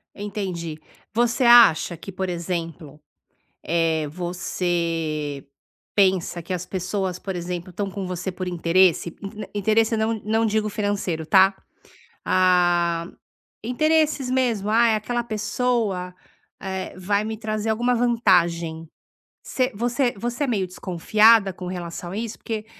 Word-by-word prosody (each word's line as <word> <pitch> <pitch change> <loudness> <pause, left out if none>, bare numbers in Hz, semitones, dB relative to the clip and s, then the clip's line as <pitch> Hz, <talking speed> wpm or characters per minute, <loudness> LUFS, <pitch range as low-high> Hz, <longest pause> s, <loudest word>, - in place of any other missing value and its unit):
Entendi, 190 -6 -5 0.4
você 240 +2 +1
acha 235 -8 +6
que, 170 +4 -9
por 190 0 -3
exemplo, 170 -3 -5 0.6
eh, 160 -1 +1
você 165 -4 -2 0.5
pensa 185 -3 +2
que 180 - -4
as 180 0 -3
pessoas, 185 0 -3
por 190 0 -5
exemplo, 175 +1 -5
tão 195 +3 -3
com 195 0 -5
você 180 +1 -4
por 185 +1 -5
interesse, 175 0 +2
in 210 +2 -6
interesse 220 +2 +2
não 220 +1 0
não 220 +1 +1
digo 215 0 0
financeiro, 205 -6 -2
tá, 190 +3 +5 0.7
ah, 175 -2 +2 0.6
interesses 305 +2 +1
mesmo, 240 -6 0
ai, 225 0 +4
aquela 240 +3 -2
pessoa, 215 -4 -1 0.5
eh, 190 -1 -4
vai 200 +3 0
me 220 0 -4
trazer 215 0 -3
alguma 240 +3 +1
vantagem, 175 -9 +2 0.6
você 255 0 0
você 240 +3 0
você 240 +5 -3
é - - 0
meio 200 -6 0
desconfiada 195 +4 +3
com 180 +1 -8
relação 175 -1 -6
a 190 - -6
isso, 225 0 -4
porque 220 -1 -5
190 Hz, 130 wpm, -23 LUFS, 175-220 Hz, 0.7 s, acha